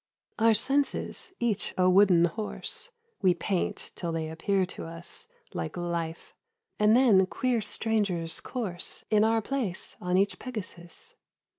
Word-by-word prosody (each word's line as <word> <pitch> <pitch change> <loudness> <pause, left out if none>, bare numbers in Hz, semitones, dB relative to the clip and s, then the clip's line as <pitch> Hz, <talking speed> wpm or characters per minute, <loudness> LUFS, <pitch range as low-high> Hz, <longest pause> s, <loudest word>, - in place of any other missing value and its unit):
Our 225 0 +5
senses, 275 - 0
each 235 -5 -1
a 185 0 +4
wooden 185 -2 +5
horse, 215 - -1 0.3
We 185 -2 +4
paint 180 +1 -2
till 170 -2 -4
they 160 -1 -3
appear 185 +4 0
to 180 - -7
us 165 - -4 0.3
Like - - -4
life, 170 -1 -4 0.5
and 210 +2 +5
then 205 -8 +5
queer 245 +2 0
strangers 200 -6 +1
course 205 -9 -2
In 210 0 +5
our 225 0 +2
place 235 -10 0
on 180 0 +1
each 200 +1 +1
Pegasus. 185 -8 -5
195 Hz, 135 wpm, -28 LUFS, 175-225 Hz, 0.5 s, Our